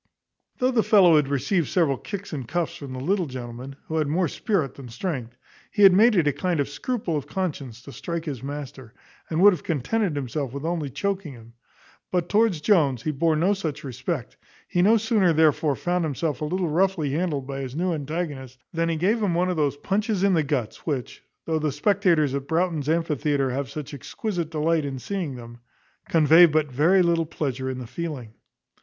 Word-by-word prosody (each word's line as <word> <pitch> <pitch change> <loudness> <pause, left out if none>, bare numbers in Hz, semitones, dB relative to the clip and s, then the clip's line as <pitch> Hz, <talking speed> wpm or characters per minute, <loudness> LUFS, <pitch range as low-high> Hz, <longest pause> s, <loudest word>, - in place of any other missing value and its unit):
Though 255 +1 +2
the 240 -3 +3
fellow 185 -7 +6
had 150 -2 +2
received 140 +4 0
several 160 -7 +2
kicks 200 -3 -7
and 135 -6 -5
cuffs 170 +2 -2
from 140 -5 -8
the 130 - -5
little 180 +5 0
gentleman, 125 +1 -7
who 160 - -3
had 155 -2 +1
more 170 +4 +1
spirit 160 - -1
than 135 -3 -11
strength, 125 -2 -4 0.3
he 205 - +1
had 195 -2 +9
made 220 +4 +5
it 170 -5 +3
a 145 - +2
kind 180 -1 -1
of 140 - +1
scruple 185 - -3
of 145 - -3
conscience 140 - -4
to 140 - -10
strike 170 +3 -5
his 140 -7 -5
master, 135 -4 -7 0.3
and 160 - -1
would 205 -1 +8
have 170 - -5
contented 170 - -1
himself 140 -1 -3
with 140 +2 -5
only 165 -4 -2
choaking 190 0 -3
him; 115 -1 -15 0.6
but 175 -2 0
towards 210 -7 +2
Jones 150 - +2
he 155 - 0
bore 160 +2 +1
no 180 +6 +2
such 160 -7 -4
respect; 130 -5 -4 0.3
he 175 - +1
no 215 +5 +5
sooner 210 -5 +2
therefore 155 -2 +3
found 175 +3 -1
himself 155 -1 -2
a - - 0
little 180 +3 -1
roughly 170 -3 +1
handled 150 -3 -1
by 135 0 -5
his 130 0 -6
new 180 +2 0
antagonist, 145 -4 -4 0.2
than 165 0 0
he 165 - 0
gave 200 +8 +1
him 190 -5 +1
one 180 +1 +1
of - - -2
those 145 -3 0
punches 205 +4 -1
in 200 -1 +4
the 165 - +3
guts 135 -7 -2
which, 135 -6 -3 0.2
though 160 -1 0
the 155 -1 0
spectators 175 - +2
at 140 0 -3
Broughton's 160 -3 0
amphitheatre 150 -4 0
have 135 0 -3
such 150 +3 -7
exquisite 170 - -4
delight 160 0 +1
in 140 -2 -4
seeing 170 0 -4
them, 120 -1 -11 0.5
convey 165 +2 +7
but 155 -2 0
very 170 +8 +4
little 170 -2 +1
pleasure 130 -4 -3
in 130 - -4
the 125 - -6
feeling. 125 -3 -6
155 Hz, 200 wpm, -24 LUFS, 140-180 Hz, 0.6 s, had